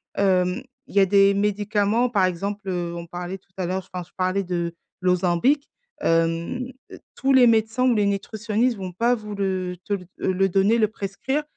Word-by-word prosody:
hem, 185 Hz, -2 st, +2 dB, 0.3 s
il -, -, -14 dB
y -, -, +6 dB
a 195 Hz, -, +5 dB
des 200 Hz, 0 st, +5 dB
médicaments, 210 Hz, +3 st, +1 dB
par 200 Hz, -5 st, +3 dB
exemple, 200 Hz, +3 st, -3 dB
heu, 175 Hz, -2 st, -2 dB
on 170 Hz, 0 st, -7 dB
parlait 180 Hz, +2 st, -6 dB
tout 190 Hz, -, -38 dB
à 185 Hz, -, -1 dB
l'heure 185 Hz, +1 st, -3 dB
enfin 180 Hz, -1 st, -4 dB
je -, -, -30 dB
parlais 185 Hz, +1 st, 0 dB
de 170 Hz, -2 st, -3 dB, 0.3 s
l'Ozempic, 180 Hz, -, +2 dB, 0.3 s
hem, 165 Hz, +9 st, 0 dB, 0.5 s
tous 270 Hz, 0 st, +1 dB
les 250 Hz, -2 st, +7 dB
médecins 225 Hz, +2 st, +2 dB
ou 240 Hz, -, +3 dB
les 210 Hz, -, +2 dB
nutritionnistes 220 Hz, +4 st, 0 dB
vont 185 Hz, -2 st, -5 dB
pas 235 Hz, +7 st, +2 dB
vous 210 Hz, -2 st, -7 dB
le 185 Hz, -2 st, -2 dB
te 205 Hz, -, -2 dB
le, 185 Hz, -2 st, -3 dB, 0.2 s
heu, 185 Hz, -, +1 dB
le 195 Hz, +1 st, +2 dB
donner, 195 Hz, +5 st, +3 dB
le 215 Hz, -2 st, +3 dB
prescrire 230 Hz, +8 st, -3 dB
195 Hz, 190 wpm, -23 LUFS, 180-220 Hz, 0.5 s, les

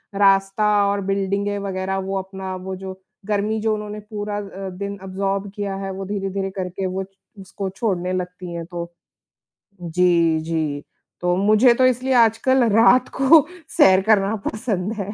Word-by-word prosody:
रास्ता 195 Hz, +1 st, +3 dB, 0.2 s
और 200 Hz, 0 st, -1 dB
बिल्डिंगें 200 Hz, +1 st, -1 dB
वगैरह, 190 Hz, -1 st, -3 dB
वो 195 Hz, 0 st, -3 dB
अपना, 190 Hz, 0 st, -6 dB
वो 190 Hz, +1 st, -6 dB
जो, 190 Hz, 0 st, -8 dB, 0.3 s
गर्मी 210 Hz, +1 st, 0 dB
जो 220 Hz, 0 st, +1 dB
उन्होंने 210 Hz, 0 st, -5 dB
पूरा 210 Hz, 0 st, -5 dB
अ, 195 Hz, -1 st, -6 dB
दिन 200 Hz, +2 st, -6 dB
एब्ज़ॉर्ब 195 Hz, +1 st, -2 dB
किया 200 Hz, -2 st, -3 dB
है, 195 Hz, 0 st, -4 dB
वो 195 Hz, 0 st, -6 dB
धीरे-धीरे 195 Hz, -1 st, -3 dB
करके 185 Hz, +1 st, -3 dB
वो 190 Hz, +1 st, -2 dB, 0.4 s
उसको 190 Hz, +1 st, -5 dB
छोड़ने 185 Hz, -2 st, -2 dB
लगती 180 Hz, -1 st, -5 dB
हैं। 170 Hz, -1 st, -5 dB
तो 170 Hz, -1 st, -6 dB, 0.9 s
जी, 170 Hz, -1 st, +2 dB
जी। 155 Hz, -3 st, -2 dB, 0.4 s
तो 180 Hz, 0 st, +1 dB
मुझे 215 Hz, +5 st, +5 dB
तो 255 Hz, +1 st, +4 dB
इसलिए 255 Hz, +1 st, +1 dB
आज 225 Hz, -2 st, +4 dB
कल 260 Hz, -1 st, +3 dB
रात 240 Hz, +4 st, +5 dB
को 280 Hz, +2 st, +6 dB, 0.3 s
सैर 190 Hz, 0 st, +6 dB
करना 210 Hz, -1 st, +3 dB
पसंद 215 Hz, -2 st, -2 dB
है, 205 Hz, -3 st, -5 dB
195 Hz, 160 wpm, -21 LUFS, 185-210 Hz, 0.9 s, को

